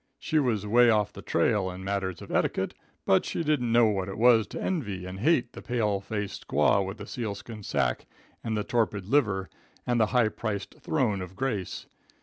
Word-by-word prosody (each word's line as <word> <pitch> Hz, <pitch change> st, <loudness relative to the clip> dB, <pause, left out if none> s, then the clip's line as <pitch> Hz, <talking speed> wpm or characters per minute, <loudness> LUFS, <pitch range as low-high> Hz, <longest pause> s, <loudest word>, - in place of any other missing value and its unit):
She 155 Hz, -1 st, 0 dB
was 115 Hz, -7 st, 0 dB
way 120 Hz, +3 st, +5 dB
off 105 Hz, -2 st, +2 dB
the -, -, -9 dB
trail 100 Hz, -3 st, +1 dB
in 90 Hz, +1 st, -7 dB
matters 95 Hz, -2 st, -2 dB
of -, -, -10 dB
etiquette, -, -, 0 dB, 0.3 s
but 95 Hz, -, +4 dB
she -, -, -2 dB
didn't 145 Hz, -7 st, +1 dB
know 120 Hz, 0 st, +6 dB
what 100 Hz, -3 st, 0 dB
it 95 Hz, -, -6 dB
was 115 Hz, -2 st, +5 dB
to -, -, -7 dB
envy 105 Hz, -, -2 dB
and 90 Hz, +1 st, -7 dB
hate 125 Hz, -2 st, +2 dB
the -, -, -9 dB
pale 110 Hz, -5 st, 0 dB
faced 105 Hz, 0 st, -5 dB
squaw 100 Hz, -, +3 dB
with 95 Hz, +3 st, -5 dB
the 105 Hz, -, -8 dB
sealskin 110 Hz, -1 st, -6 dB
sacque -, -, -1 dB, 0.4 s
and 110 Hz, -1 st, -1 dB
the 105 Hz, -, 0 dB
torpid 105 Hz, -5 st, 0 dB
liver, 100 Hz, -6 st, +1 dB, 0.4 s
and 120 Hz, -1 st, +1 dB
the 110 Hz, -, +4 dB
high 120 Hz, -1 st, +3 dB
priced 105 Hz, -3 st, -5 dB
throne 120 Hz, -11 st, 0 dB
of 90 Hz, 0 st, -8 dB
grace. 105 Hz, -7 st, -3 dB
105 Hz, 195 wpm, -28 LUFS, 100-120 Hz, 0.4 s, know